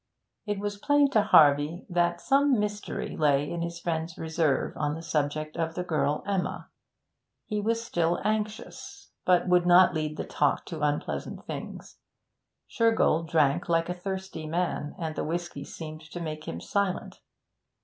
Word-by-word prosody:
It 205 -1 -1
was 205 0 -4
plain 290 +3 +3
to 220 - +4
Harvey 150 -3 +4
that 175 -1 +1
some 275 +2 +3
mystery 210 0 -3
lay 145 -2 +2
in 170 +2 -4
his 170 0 -4
friend's 165 -1 -3
reserve 160 -3 0
on 145 0 -1
the 165 - -8
subject 155 -1 -1
of 165 -1 -2
the 180 - -2
girl 150 -3 0
Emma; 195 -2 -2 0.8
he 210 -1 -2
was 230 +2 0
still 170 -5 0
anxious, 215 0 -4
but 180 0 +3
would 180 -1 +4
not 180 +1 +7
lead 155 -1 -2
the - - -2
talk 145 - 0
to 160 -3 -6
unpleasant 150 0 -2
things. - - -8 0.7
Shergold 225 -8 +2
drank 150 -1 +2
like 165 0 +2
a - - 0
thirsty 190 -3 -5
man, 165 -2 -2
and 160 -3 -4
the - - -2
whisky 170 -3 -4
seemed 155 +1 -8
to 175 - -6
make 155 -2 -5
him 85 - -4
silent. 200 - -2
170 Hz, 160 wpm, -28 LUFS, 155-195 Hz, 0.8 s, not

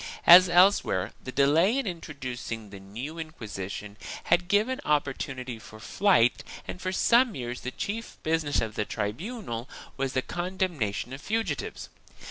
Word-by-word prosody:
As 180 +1 +10
else 185 +3 +6
where, 95 +3 -2
the 130 - -6
delay 160 - +3
in 275 - -1
introducing 130 - -6
the 100 - -9
new 120 +12 -7
Inquisition 105 - -6 0.3
had 175 0 +2
given 215 +7 +1
opportunity 135 -4 -2
for 110 0 -13
flight 125 - +3 0.2
and 185 - -6
for 185 - -2
some 235 +5 +4
years 125 -1 -5
the 130 - -3
chief 220 - -5
business 155 -2 +1
of 110 -1 -3
the 105 - -1
tribunal 120 - -4 0.3
was 135 -1 -1
the 130 - 0
condemnation 175 - -2
of 135 - -7
fugitives. 215 -9 -3
145 Hz, 145 wpm, -27 LUFS, 120-185 Hz, 0.3 s, As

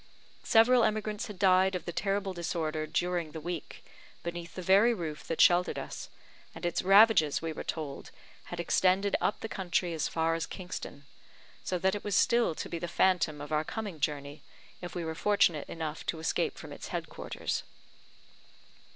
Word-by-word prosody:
Several 240 +1 +5
emigrants 215 +1 -1
had 210 -3 -9
died 185 0 +4
of 180 - -4
the 175 - -3
terrible 195 +1 -1
disorder 160 -3 -2
during 175 -1 -1
the 160 - -5
week, 170 0 -6 0.4
beneath 170 0 -6
the 185 - -5
very 200 +6 +5
roof 160 -6 -5
that 165 - -3
sheltered 175 +1 +5
us, - - -6 0.5
and - - -6
its 175 - 0
ravages, 195 -6 +6
we 165 -1 -4
were - - -6
told, 150 -4 -5 0.4
had 175 - -7
extended 185 +3 +2
up 210 - 0
the - - -3
country 180 -3 -1
as 160 - -1
far 165 0 0
as 165 0 -2
Kingston; 175 -6 -7 0.6
so 185 - -1
that 190 +2 +1
it 205 - -4
was 205 -2 -1
still 235 -7 +3
to - - -5
be 170 - -4
the 175 - -4
phantom 170 -5 +2
of 145 +1 -8
our 155 0 +2
coming 205 -2 -5
journey, 145 0 -3 0.4
if 175 -3 -7
we 175 -2 -3
were 160 - -3
fortunate 175 -4 +2
enough 160 -1 -5
to 165 - -1
escape 160 0 -1
from - - -9
its - - -8
head - - -4
quarters. - - -4
175 Hz, 180 wpm, -30 LUFS, 160-195 Hz, 0.6 s, ravages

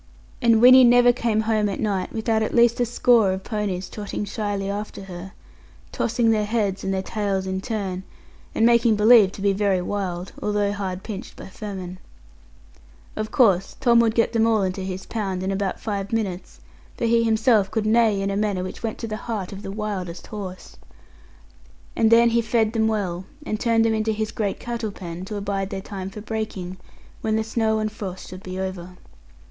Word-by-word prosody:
And 230 -2 +4
Winnie 255 +1 +9
never 245 0 +6
came 230 -3 0
home 215 -1 +1
at 195 - -4
night 200 -4 -1
without 220 0 0
at 220 - -1
least 235 0 +4
a 245 - +2
score 235 -4 +3
of 190 0 -5
ponies 200 -4 -3
trotting 210 0 -5
shyly 205 -1 -3
after 200 0 -5
her, 190 0 -9 0.6
tossing 230 0 +1
their 210 -1 +1
heads 205 -4 -1
and 195 - -1
their 190 0 -1
tails 195 -2 -2
in 190 0 -3
turn, 195 -5 -3 0.5
and 225 - +3
making 235 -1 +4
believe 210 -2 +6
to - - -9
be 200 -1 +3
very 195 -1 +1
wild, 180 -1 -3
although 205 -1 0
hard 190 -2 -4
pinched 215 +1 -7
by - - -10
famine. 185 -3 -7 1.2
Of 215 0 -3
course 195 -7 +3
Tom 240 -3 +5
would 230 -1 +3
get 230 - +2
them 225 0 +3
all 220 -3 +2
into 185 +1 -2
his 190 0 -5
pound 195 -5 -3
in 190 - -1
about 195 -1 -2
five 200 -2 -4
minutes, 200 -5 -3 0.4
for 235 - -1
he 230 0 +3
himself 220 -2 +3
could 220 0 -1
neigh 215 -3 +3
in 195 - -1
a - - -2
manner 205 -3 0
which 185 - -7
went 225 -2 -3
to 230 - -3
the 215 -1 -4
heart 215 -5 -4
of 195 - -8
the 195 - -6
wildest 195 -5 -4
horse. 195 -4 -8 1.2
And 225 - +3
then 235 +1 +6
he 235 0 +3
fed 220 -1 +1
them 220 -1 +2
well, 190 -5 -2 0.2
and 215 - -2
turned 230 -1 +2
them 225 - +2
into 220 0 0
his 215 +1 -3
great 205 -3 -2
cattle 235 -2 -4
pen, 175 -1 -7
to 210 - -6
abide 200 -1 -2
their 195 -2 -4
time 190 -1 -6
for 210 +2 -9
breaking, 205 -4 -4 0.4
when 220 0 0
the 220 - +1
snow 220 0 0
and 215 0 -1
frost 190 -4 -7
should 185 +1 -9
be 185 0 -6
over. 185 -1 -5
210 Hz, 195 wpm, -23 LUFS, 190-225 Hz, 1.2 s, Winnie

